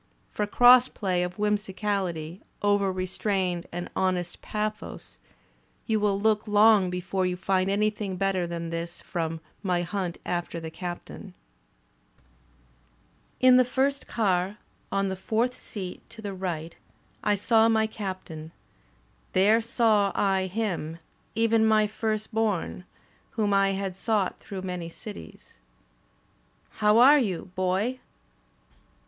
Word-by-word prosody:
For 210 Hz, -, -2 dB
cross 245 Hz, +3 st, +7 dB
play 185 Hz, -4 st, -1 dB
of 180 Hz, 0 st, -3 dB
whimsicality 195 Hz, -5 st, -2 dB, 0.2 s
over 205 Hz, -1 st, +3 dB
restrained 185 Hz, -1 st, -1 dB
and 175 Hz, +1 st, -4 dB
honest 180 Hz, -2 st, -1 dB
pathos, 215 Hz, 0 st, -5 dB, 0.7 s
you 220 Hz, -2 st, +1 dB
will 205 Hz, -1 st, +1 dB
look 215 Hz, +1 st, +1 dB
long 210 Hz, -2 st, +5 dB
l)efore 180 Hz, +1 st, -1 dB
you 180 Hz, -, -3 dB
find 190 Hz, 0 st, +1 dB
anything 210 Hz, -1 st, 0 dB
better 190 Hz, -2 st, 0 dB
than 170 Hz, -1 st, -5 dB
this 170 Hz, +1 st, -5 dB
from 165 Hz, -1 st, -4 dB, 0.2 s
"My 180 Hz, -3 st, 0 dB
Hunt 180 Hz, -1 st, -3 dB
After 175 Hz, -1 st, -3 dB
the 160 Hz, -1 st, -7 dB
Captain." 175 Hz, +1 st, -7 dB, 2.1 s
In 255 Hz, 0 st, +7 dB
the 255 Hz, -, +6 dB
first 270 Hz, +3 st, 0 dB
car, 195 Hz, -2 st, 0 dB, 0.3 s
on 195 Hz, 0 st, +1 dB
the 190 Hz, -, -2 dB
fourth 225 Hz, +6 st, 0 dB
seat 190 Hz, -7 st, -7 dB
to 230 Hz, -, -13 dB
the 200 Hz, -1 st, -4 dB
right, 170 Hz, -4 st, -4 dB, 0.5 s
I 205 Hz, -, +3 dB
saw 225 Hz, +2 st, +4 dB
my 220 Hz, -1 st, +3 dB
Captain; 185 Hz, -7 st, -6 dB, 0.8 s
there 210 Hz, +5 st, +4 dB
saw 220 Hz, -3 st, +2 dB
I 190 Hz, -2 st, +1 dB
him, 180 Hz, -6 st, -3 dB, 0.4 s
even 225 Hz, 0 st, +3 dB
my 215 Hz, -1 st, +4 dB
firstborn, 215 Hz, -3 st, -2 dB, 0.5 s
whom 210 Hz, -2 st, +2 dB
I 195 Hz, 0 st, +3 dB
had 195 Hz, -1 st, -3 dB
sought 205 Hz, -1 st, 0 dB
through 190 Hz, -2 st, -7 dB
many 180 Hz, -2 st, -4 dB
cities. 205 Hz, +5 st, -11 dB, 1.2 s
"*How 210 Hz, 0 st, +5 dB
are 275 Hz, +5 st, +8 dB
you. 190 Hz, -6 st, -2 dB
Boy? 190 Hz, +7 st, 0 dB
195 Hz, 125 wpm, -27 LUFS, 180-215 Hz, 2.1 s, are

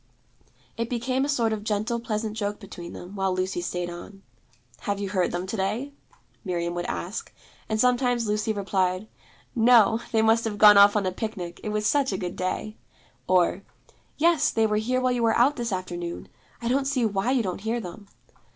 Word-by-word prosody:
It 230 Hz, 0 st, -2 dB
became 255 Hz, +2 st, 0 dB
a -, -, -4 dB
sort 235 Hz, -6 st, +1 dB
of 210 Hz, -1 st, -4 dB
gentle 215 Hz, +3 st, -1 dB
pleasant 215 Hz, -1 st, -3 dB
joke 205 Hz, -1 st, -3 dB
between 175 Hz, -4 st, -9 dB
them, 180 Hz, +3 st, -9 dB
while 195 Hz, -1 st, 0 dB
Lucy 185 Hz, -1 st, -1 dB
stayed 175 Hz, 0 st, -3 dB
on. 195 Hz, +3 st, -10 dB, 0.6 s
'Have 200 Hz, -2 st, -2 dB
you 200 Hz, -1 st, -3 dB
heard 185 Hz, -2 st, 0 dB
them 175 Hz, +1 st, -3 dB
to 195 Hz, -, -4 dB
day?' 225 Hz, +8 st, -2 dB, 0.5 s
Miriam 175 Hz, -3 st, -2 dB
would 175 Hz, 0 st, -3 dB
ask; 190 Hz, +6 st, -4 dB, 0.4 s
and 220 Hz, 0 st, 0 dB
sometimes 245 Hz, -1 st, +2 dB
Lucy 210 Hz, +1 st, 0 dB
replied, 190 Hz, -1 st, -1 dB, 0.5 s
'No; 230 Hz, -1 st, +5 dB
they 220 Hz, -1 st, +3 dB
must 225 Hz, +1 st, +4 dB
have 210 Hz, -2 st, -3 dB
gone 210 Hz, 0 st, +9 dB
off 200 Hz, +1 st, +7 dB
on 205 Hz, -2 st, +1 dB
a 185 Hz, -, 0 dB
picnic; 185 Hz, -4 st, -5 dB
it 215 Hz, -, -3 dB
was 210 Hz, 0 st, -1 dB
such 280 Hz, +1 st, +2 dB
a 190 Hz, -, -1 dB
good 180 Hz, -2 st, -4 dB
day'; 185 Hz, +3 st, -3 dB, 0.5 s
or 180 Hz, +1 st, +3 dB, 0.6 s
'Yes; 335 Hz, +1 st, +3 dB
they 225 Hz, -1 st, +2 dB
were 210 Hz, -1 st, +1 dB
here 250 Hz, +4 st, 0 dB
while 255 Hz, 0 st, +1 dB
you 245 Hz, -1 st, 0 dB
were 225 Hz, -1 st, +3 dB
out 270 Hz, +5 st, +4 dB
this 235 Hz, -4 st, -3 dB
afternoon. 175 Hz, -2 st, -5 dB, 0.3 s
I -, -, -1 dB
don't 270 Hz, +3 st, +1 dB
see 265 Hz, -4 st, +1 dB
why 200 Hz, +1 st, 0 dB
you 260 Hz, -3 st, +2 dB
don't 185 Hz, -1 st, -4 dB
hear 225 Hz, +3 st, -1 dB
them.' 200 Hz, 0 st, -9 dB
210 Hz, 195 wpm, -26 LUFS, 190-235 Hz, 0.6 s, gone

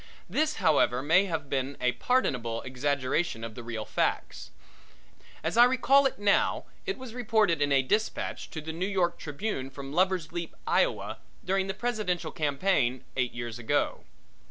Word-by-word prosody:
This, 310 Hz, 0 st, 0 dB
however, 130 Hz, -, +3 dB
may 170 Hz, +7 st, +4 dB
have 160 Hz, -6 st, -3 dB
been 135 Hz, +1 st, -2 dB
a 125 Hz, 0 st, +2 dB
pardonable 125 Hz, -, 0 dB
exaggeration 130 Hz, 0 st, -1 dB
of 115 Hz, -1 st, -5 dB
the 120 Hz, -, -8 dB
real 115 Hz, -2 st, -5 dB
facts. -, -, -2 dB, 0.9 s
As -, -, -1 dB
I 240 Hz, -, +9 dB
recall 270 Hz, +2 st, +4 dB
now, 205 Hz, 0 st, +2 dB, 0.2 s
it 390 Hz, -, -1 dB
was 260 Hz, -3 st, -9 dB
reported 215 Hz, -9 st, +2 dB
in 145 Hz, 0 st, +2 dB
a 135 Hz, -1 st, +4 dB
dispatch 210 Hz, +11 st, -1 dB
to 160 Hz, -, -6 dB
the 160 Hz, +1 st, -6 dB
New 180 Hz, +4 st, -2 dB
York 175 Hz, -3 st, 0 dB
Tribune 145 Hz, -3 st, -4 dB
from 135 Hz, +1 st, -8 dB
Lover's 185 Hz, -2 st, +1 dB
Leap, 170 Hz, -1 st, -5 dB
Iowa, -, -, +1 dB, 0.3 s
during 190 Hz, +1 st, +1 dB
the 195 Hz, -, -3 dB
presidential 200 Hz, -8 st, -2 dB
campaign 140 Hz, -4 st, +1 dB
eight 125 Hz, -2 st, 0 dB
years 120 Hz, 0 st, -5 dB
ago. 115 Hz, -, 0 dB
160 Hz, 155 wpm, -28 LUFS, 130-200 Hz, 0.9 s, I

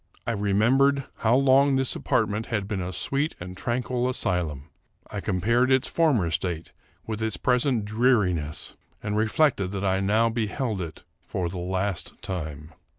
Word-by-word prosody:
I -, -, 0 dB
remembered 120 Hz, +7 st, +3 dB
how 115 Hz, +2 st, +3 dB
long 135 Hz, +1 st, +4 dB
this 130 Hz, -1 st, +2 dB
apartment 110 Hz, -4 st, 0 dB
had 105 Hz, -4 st, -2 dB
been 100 Hz, -2 st, -2 dB
a 90 Hz, +1 st, -4 dB
sweet 140 Hz, -, 0 dB
and 90 Hz, +1 st, -7 dB
tranquil 125 Hz, +4 st, -1 dB
asylum; 85 Hz, -, -1 dB, 0.5 s
I -, -, -4 dB
compared 115 Hz, +8 st, +1 dB
its 130 Hz, +1 st, +3 dB
former 130 Hz, -, +2 dB
state 85 Hz, 0 st, -3 dB, 0.3 s
with 110 Hz, -1 st, -4 dB
its 110 Hz, -1 st, -1 dB
present 125 Hz, -3 st, +1 dB
dreariness, 105 Hz, -, 0 dB, 0.3 s
and 105 Hz, 0 st, -2 dB
reflected 110 Hz, -1 st, +2 dB
that 100 Hz, 0 st, -2 dB
I 95 Hz, 0 st, +2 dB
now 105 Hz, +4 st, +3 dB
beheld 110 Hz, -1 st, -2 dB
it 80 Hz, -3 st, -7 dB, 0.2 s
for 90 Hz, -2 st, -2 dB
the 90 Hz, +1 st, -6 dB
last 95 Hz, 0 st, -3 dB
time. 80 Hz, -4 st, -5 dB
105 Hz, 150 wpm, -26 LUFS, 90-125 Hz, 0.5 s, long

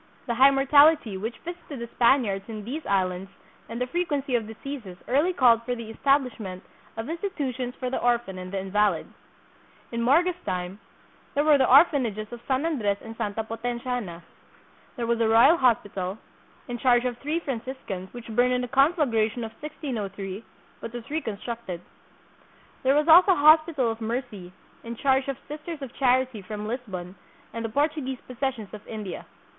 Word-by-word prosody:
The 240 Hz, -, -1 dB
high 260 Hz, +4 st, +7 dB
mortality 275 Hz, -3 st, +5 dB
which 220 Hz, +5 st, -4 dB
visited 340 Hz, -4 st, -7 dB
the 235 Hz, -, -5 dB
Spaniards 235 Hz, -6 st, +2 dB
in 215 Hz, -2 st, -6 dB
these 295 Hz, +7 st, -5 dB
islands 190 Hz, -1 st, 0 dB, 0.4 s
and 230 Hz, +1 st, -5 dB
the 250 Hz, -, 0 dB
frequency 285 Hz, -2 st, -2 dB
of 230 Hz, -3 st, +1 dB
diseases 225 Hz, -4 st, -8 dB
early 290 Hz, +8 st, +2 dB
called 245 Hz, -9 st, +4 dB
for 245 Hz, +1 st, -3 dB
the 230 Hz, -2 st, -7 dB
establishment 235 Hz, -8 st, 0 dB, 0.3 s
of 225 Hz, -, -3 dB
institu 330 Hz, -3 st, -3 dB
tions 250 Hz, 0 st, -5 dB
for 255 Hz, -1 st, -4 dB
the -, -, -1 dB
orphan 240 Hz, -6 st, 0 dB
and 185 Hz, 0 st, -7 dB
the 195 Hz, -, -2 dB
invalid. 195 Hz, -2 st, +1 dB, 0.9 s
In 235 Hz, 0 st, -2 dB
Morga's 345 Hz, +9 st, +3 dB
time 180 Hz, +2 st, -4 dB, 0.6 s
there 290 Hz, -, +3 dB
were 300 Hz, -2 st, +5 dB
the 260 Hz, -, +3 dB
orphanages 250 Hz, -, +4 dB
of 240 Hz, -, -8 dB
San 265 Hz, +3 st, +1 dB
Andres 220 Hz, -12 st, 0 dB
and 225 Hz, 0 st, -9 dB
Santa 210 Hz, +1 st, -2 dB
Potenciana. 230 Hz, -5 st, -4 dB, 0.7 s
There 240 Hz, -3 st, -3 dB
was 235 Hz, 0 st, 0 dB
the 225 Hz, -1 st, +2 dB
Royal 230 Hz, +9 st, +7 dB
Hospital, 205 Hz, -, 0 dB, 0.5 s
in 240 Hz, -1 st, -5 dB
charge 245 Hz, -1 st, +3 dB
of 245 Hz, -1 st, -2 dB
three 305 Hz, +4 st, -1 dB
Franciscans, 235 Hz, -, -5 dB
which 240 Hz, -1 st, -10 dB
burned 245 Hz, +3 st, +2 dB
in 250 Hz, -, +1 dB
the 250 Hz, -, -3 dB
conflagration 250 Hz, -, +2 dB
of 220 Hz, -, -5 dB
1603, 210 Hz, -, -5 dB, 0.4 s
but 230 Hz, -, -7 dB
was 240 Hz, -1 st, -7 dB
reconstructed. 230 Hz, -, -4 dB, 1.0 s
There 265 Hz, +1 st, +3 dB
was 300 Hz, +2 st, +2 dB
also 360 Hz, +4 st, +8 dB
a 290 Hz, -4 st, -1 dB
Hospital 310 Hz, -6 st, +5 dB
of 225 Hz, +1 st, -7 dB
Mercy, 220 Hz, -5 st, -4 dB, 0.3 s
in 235 Hz, 0 st, -6 dB
charge 265 Hz, +2 st, +2 dB
of 275 Hz, -2 st, -3 dB
Sisters 300 Hz, 0 st, -7 dB
of 255 Hz, -, -8 dB
Charity 255 Hz, -3 st, +1 dB
from 210 Hz, +2 st, -6 dB
Lisbon 195 Hz, -7 st, -5 dB, 0.4 s
and 230 Hz, -, -4 dB
the 225 Hz, -, -2 dB
Portuguese 285 Hz, +1 st, -1 dB
possessions 250 Hz, -4 st, -4 dB
of 210 Hz, -, -8 dB
India. 210 Hz, -5 st, -6 dB
240 Hz, 170 wpm, -26 LUFS, 215-275 Hz, 1.0 s, also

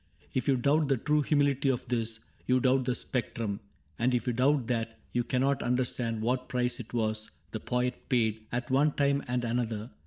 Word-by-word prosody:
If 130 Hz, -, -1 dB
you 135 Hz, -2 st, +4 dB
doubt 145 Hz, +4 st, +3 dB
the 135 Hz, -1 st, +2 dB
true 150 Hz, +6 st, +2 dB
humility 140 Hz, -2 st, +2 dB
of 125 Hz, -2 st, -1 dB
this, 115 Hz, -2 st, -1 dB, 0.3 s
You 125 Hz, 0 st, +4 dB
doubt 130 Hz, 0 st, +3 dB
the 125 Hz, -1 st, +1 dB
spectrum; 115 Hz, -4 st, -2 dB, 0.4 s
and 125 Hz, +2 st, +2 dB
if 120 Hz, -, -1 dB
you 125 Hz, -, 0 dB
doubt 130 Hz, +2 st, +3 dB
that. 115 Hz, -1 st, -2 dB
You 120 Hz, -, +1 dB
cannot 130 Hz, +3 st, +1 dB
understand 120 Hz, -2 st, 0 dB
what 125 Hz, +2 st, 0 dB
price 125 Hz, 0 st, 0 dB
it 115 Hz, -2 st, -8 dB
was 110 Hz, -2 st, -1 dB, 0.2 s
The -, -, -3 dB
poet 125 Hz, 0 st, -2 dB
paid, 110 Hz, -4 st, +1 dB
at 120 Hz, +1 st, -2 dB
one 145 Hz, +3 st, +4 dB
time 140 Hz, 0 st, +2 dB
and 125 Hz, 0 st, 0 dB
another. 115 Hz, -1 st, -2 dB
125 Hz, 190 wpm, -30 LUFS, 115-135 Hz, 0.4 s, you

